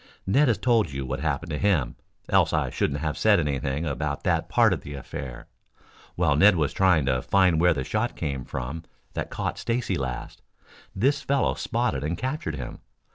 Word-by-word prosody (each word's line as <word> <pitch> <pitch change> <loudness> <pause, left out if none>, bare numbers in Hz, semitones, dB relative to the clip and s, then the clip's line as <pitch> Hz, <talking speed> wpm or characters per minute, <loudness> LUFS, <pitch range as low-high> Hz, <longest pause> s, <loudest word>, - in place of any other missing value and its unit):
Ned 140 +10 +3
has 115 -4 +2
told 115 -8 +2
you 70 -1 -4
what 65 - -3
happened 80 +2 -2
to 75 - -2
him, 90 -12 +1 0.3
else - - +3
I - - 0
shouldn't 70 - -1
have 75 -1 -2
said 105 -3 +5
anything 70 0 -1
about 70 -1 -3
that - - 0
part - - +4
of - - -4
the 70 - -8
affair. 65 -2 -7 0.7
While 80 -5 +2
Ned 100 +6 +6
was 75 -5 0
trying 90 -7 +3
to 65 -2 +1
find 90 -2 +3
where 90 -1 +4
the 65 - -2
shot 110 - -1
came 70 -5 -3
from 65 +7 -5 0.3
that - - -3
caught - - -3
Stacy 115 -6 -1
last, 65 -3 -5 0.5
this 130 +9 +2
fellow 140 -2 +1
spotted 115 - -1
and 80 +3 -2
captured 130 - -3
him. 60 -4 -7
80 Hz, 185 wpm, -25 LUFS, 70-100 Hz, 0.7 s, Ned